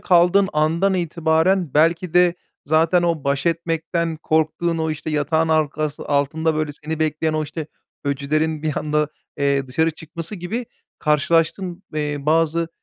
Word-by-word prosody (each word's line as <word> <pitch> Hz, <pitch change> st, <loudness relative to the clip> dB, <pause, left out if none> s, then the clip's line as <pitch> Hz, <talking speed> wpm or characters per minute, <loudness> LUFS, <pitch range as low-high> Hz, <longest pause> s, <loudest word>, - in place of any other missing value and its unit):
kaldığın 180 Hz, +2 st, +4 dB
andan 165 Hz, +6 st, +2 dB
itibaren 170 Hz, -1 st, +1 dB
belki 165 Hz, +3 st, +2 dB
de 180 Hz, -1 st, +5 dB, 0.3 s
zaten 165 Hz, +4 st, +3 dB
o 165 Hz, -4 st, 0 dB
baş 140 Hz, +2 st, 0 dB
etmekten 165 Hz, 0 st, -1 dB
korktuğun 160 Hz, +2 st, 0 dB
o, 160 Hz, 0 st, 0 dB
işte, 155 Hz, +1 st, -4 dB
yatağın 160 Hz, +2 st, +1 dB
arkası 155 Hz, -1 st, 0 dB
altında, 155 Hz, +3 st, +1 dB
böyle, 155 Hz, -1 st, -1 dB
seni 155 Hz, +2 st, -5 dB
bekleyen 155 Hz, 0 st, 0 dB
o, 155 Hz, -, 0 dB
işte, 155 Hz, +1 st, -6 dB, 0.4 s
öcülerin 150 Hz, +2 st, -1 dB
bir 155 Hz, -2 st, -2 dB
anda, 150 Hz, 0 st, 0 dB, 0.3 s
eee, 140 Hz, -1 st, +1 dB
dışarı 160 Hz, +5 st, +1 dB
çıkması 165 Hz, +4 st, -7 dB
gibi 210 Hz, +7 st, -4 dB, 0.3 s
karşılaştığın, 165 Hz, +4 st, +1 dB
eee, 150 Hz, -1 st, -1 dB
bazı, 165 Hz, +2 st, +1 dB
160 Hz, 140 wpm, -21 LUFS, 150-170 Hz, 0.4 s, de